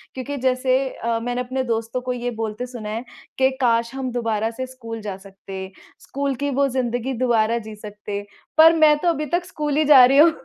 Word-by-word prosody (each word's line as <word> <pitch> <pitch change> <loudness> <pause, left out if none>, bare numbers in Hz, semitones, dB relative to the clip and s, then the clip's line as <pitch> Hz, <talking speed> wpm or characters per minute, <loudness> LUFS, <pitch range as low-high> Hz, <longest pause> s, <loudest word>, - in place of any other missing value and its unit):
क्योंकि 280 +2 -4
जैसे 255 0 +1 0.2
अ, 230 -1 -2
मैंने 245 +2 -2
अपने 260 +1 -2
दोस्तों 230 +1 -2
को 250 0 -2
ये 245 0 -3
बोलते 225 +1 -4
सुना 230 -4 -7
है 225 +3 -4 0.3
कि, 265 0 +4
"काश 235 0 +2
हम 260 -2 -3
दोबारा 225 -2 -1
से 260 +3 -5
स्कूल 230 -3 -8
जा 205 -2 -5
सकते, 195 -1 -9 0.3
स्कूल 280 0 -3
की 285 - +1
वो 280 - +4
ज़िंदगी 245 0 -2
दोबारा 230 -1 +2
जी 215 - -8
सकते।" 205 -1 -7 0.3
पर 325 +1 +8
मैं 310 -2 +5
तो 350 - -1
अभी 305 -2 -1
तक 350 0 -1
स्कूल 295 -4 -2
ही 310 - +3
जा 275 -4 +9
रही 270 +2 +3
हूँ, 325 +2 +8
245 Hz, 205 wpm, -22 LUFS, 225-265 Hz, 0.3 s, जा